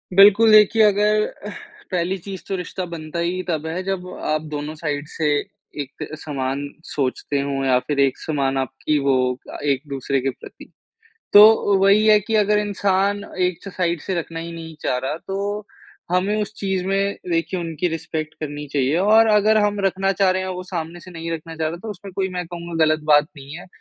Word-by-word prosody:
बिल्कुल 205 +3 +7
देखिए 215 +1 +6
अगर 210 +1 +3 0.3
अह - - -5 0.4
पहली 185 +1 0
चीज़ 195 -2 -7
तो 195 - -2
रिश्ता 180 +1 -4
बनता 155 +1 -5
ही 175 +2 -1
तब 160 -2 -1
है 175 +3 -3
जब 190 -1 -3 0.2
आप 155 - +1
दोनों 150 +1 -4
साइड 150 -2 -3
से 155 0 -2 0.5
एक 140 0 -7 0.2
समान 135 -1 -3 0.2
सोचते 140 +1 -2
हों 140 -1 -2
या 130 -1 +4
फ़िर 140 +2 -3
एक 135 - -2
समान 135 -3 -1
आपकी 135 +3 -1
वो 140 -1 +2 0.3
अ, - - -7
एक-दूसरे 140 -1 -1
के 135 - 0
प्रति। 130 - -11 0.6
तो 210 -1 +7
वही 205 +2 +5
है 215 -1 +7
कि 215 +2 -4
अगर 210 +1 +2
इंसान 200 -1 0 0.3
एक 180 - -8
साइड 175 -3 -1
से 190 - -3
रखना 165 0 -5
ही 170 +1 -7
नहीं 165 -1 -8
चाह 125 - 0
रहा 135 +4 -3
तो, 205 +2 -3 0.5
हमें 195 +4 +1
उस 210 0 -3
चीज़ 190 -2 -2
में 195 +1 0 0.2
देखिए 170 +2 -1
उनकी 165 0 -2
रिस्पेक्ट 160 -1 -4
करनी 145 -1 -5
चाहिए 140 +1 +1
और 215 +4 +5
अगर 215 +1 +4
हम 205 0 0
रखना 195 0 +1
चाह 195 -1 +2
रहे 185 0 0
हैं 190 - -4
और 185 - -3
वो 180 - -5
सामने 170 0 -4
से 185 - -12
नहीं 165 -1 -6
रखना 165 0 -6
चाह 160 - -1
रहा 160 - -3
है 170 - -10
तो 225 - -6
उसमें 195 -1 -9
कोई 190 +1 -1
मैं 180 - -3
कहूँगा 170 -1 -1
ग़लत 155 0 +2
बात 145 0 +6
नहीं 140 +3 -9
है। - - -11
175 Hz, 200 wpm, -21 LUFS, 150-195 Hz, 0.6 s, बिल्कुल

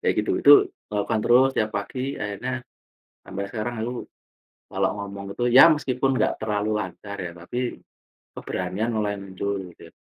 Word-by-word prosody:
Kayak - - +1
gitu, - - -1
itu - - +8 0.4
lakukan 105 +2 0
terus 130 +2 +5
tiap 110 0 +1
pagi, 130 +7 -3
akhirnya 125 +6 -4 0.6
sampai 100 +1 -5
sekarang 120 +2 -3
aku 120 +2 -3 0.8
kalau 95 0 +1
ngomong 100 0 -6
gitu, 120 - -2
ya 135 +7 +9
meskipun 135 -4 +1
nggak 110 - +2
terlalu 105 0 -1
lancar 100 +2 -7
ya, 90 -2 -5
tapi 85 +8 -5 0.8
keberanian 95 +5 -3
mulai 105 -1 0
muncul 100 +1 -4 0.2
gitu - - -18
ya. - - -37
105 Hz, 155 wpm, -24 LUFS, 100-125 Hz, 0.8 s, ya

